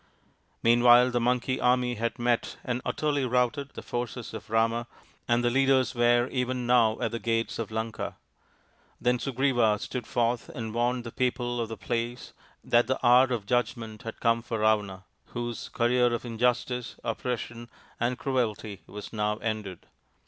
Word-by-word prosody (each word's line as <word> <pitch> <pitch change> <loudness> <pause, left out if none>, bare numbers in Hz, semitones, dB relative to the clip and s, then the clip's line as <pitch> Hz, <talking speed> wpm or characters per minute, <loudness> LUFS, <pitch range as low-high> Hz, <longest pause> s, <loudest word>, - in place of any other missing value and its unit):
Meanwhile 120 +1 +6
the 120 - +1
Monkey 125 +2 +1
army 125 0 +2
had 115 +1 -2
met 120 -1 0
and 125 0 -2
utterly 145 -2 0
outed 125 +3 0
the - - -7
forces 120 -1 -4
of 110 - -8
Ravana, 115 +1 +1 0.4
and 120 0 +2
the 120 - +2
leaders 135 -1 +3
were 120 0 +3
ven 125 -1 -2
now 120 -3 +4
at - - -1
the 115 - -3
gates 115 -1 -1
of 115 - -3
Lanka. 110 0 -4 0.8
Then 125 0 +1
Sugriva 125 -5 +2
tood 125 +1 -5
forth 120 0 0
and 110 -2 -5
warned 120 +1 0
the 115 - -7
people 120 -1 -1
of 115 - -3
the 115 - -6
place 120 +3 -3 0.3
that 120 0 +3
he 130 - +3
hour 125 +1 +7
of 120 -6 -3
judgment 110 -1 -1
had 115 -3 -7
come 115 0 +2
for 115 0 -4
Ravana, 105 -3 +1 0.2
whose 120 -1 -5
:areer 120 +1 +3
of 120 +1 -3
injustice, 120 +1 -1
oppression, 120 0 -4 0.3
and 120 +1 0
cruelty 110 -7 -2
was 105 +1 -9
now 105 -1 0
sided. 105 -5 -4
120 Hz, 160 wpm, -28 LUFS, 115-125 Hz, 0.8 s, hour